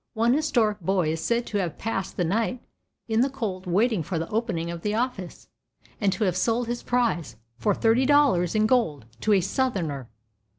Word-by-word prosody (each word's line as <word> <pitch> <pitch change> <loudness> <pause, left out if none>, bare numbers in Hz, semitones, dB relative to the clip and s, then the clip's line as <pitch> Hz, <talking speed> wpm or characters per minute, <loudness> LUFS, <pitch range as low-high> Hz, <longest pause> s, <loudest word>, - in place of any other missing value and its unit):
One 230 +2 +3
historic 240 -8 +1
boy 180 -2 +1
is 160 0 -3
said 235 0 0
to 205 - -2
have 175 -5 -3
passed 195 -4 -3
the 180 - +1
night 225 +8 0 0.5
in 225 0 +2
the 270 - +2
cold 200 -8 -4
waiting 205 +3 +2
for 165 +3 -3
the 165 +1 -2
opening 210 -7 -2
of 170 -1 -6
the 210 +2 -1
office, 230 -7 -3 0.5
and 200 -3 +2
to 220 - -2
have 185 -4 +1
sold 230 +5 +1
his 240 +1 -3
prize 235 - 0 0.2
for 205 -3 +1
thirty 235 +3 +3
dollars 275 - +3
in 215 0 +3
gold 215 - +1
to 215 - +2
"a 195 - +4
Southerner." 175 - -2
215 Hz, 195 wpm, -25 LUFS, 180-240 Hz, 0.5 s, a